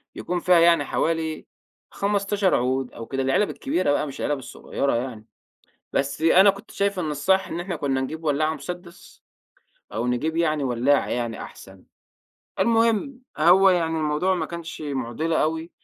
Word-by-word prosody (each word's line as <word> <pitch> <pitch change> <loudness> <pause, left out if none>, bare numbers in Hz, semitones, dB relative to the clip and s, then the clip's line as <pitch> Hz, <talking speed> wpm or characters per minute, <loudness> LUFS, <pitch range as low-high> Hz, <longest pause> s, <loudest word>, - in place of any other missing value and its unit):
بيكون 180 0 -3
فيها 180 0 +4
يعني 165 -3 +4
حوالي 160 0 -1 0.5
15 200 -1 +1
عود 130 +1 0
أو 115 - -8
كده 135 0 -3
العلب 135 +10 +2
الكبيرة 185 - -1
بقى 145 - 0
مش 140 - -8
العلب 145 -2 -1
الصغيرة 135 +1 -3
يعني، 115 -3 -4 0.7
بس 140 +2 -1
أنا 185 +5 +6
كنت 200 +2 -4
شايف 200 -1 -1
إن 155 -3 -2
الصح 190 +7 +1
إن 165 - -5
إحنا 175 0 -4
كنا 135 -3 -1
نجيب 160 +5 -5
ولاعة 155 +1 +1
مسدس، 175 0 -10 0.7
أو 115 +2 -2
نجيب 155 +7 -1
يعني 155 -4 +1
ولاعة 130 +3 +2
يعني 120 -2 -3
أحسن، 95 -1 -12 0.7
المهم 230 +4 +2 0.2
هو 180 +5 +6
يعني 165 -3 +1
الموضوع 155 +5 +1
ما 165 -3 -2
كانش 170 -1 -7
مُعضلة 145 +3 -1
أوي 160 +2 -2
160 Hz, 155 wpm, -24 LUFS, 135-180 Hz, 0.7 s, أنا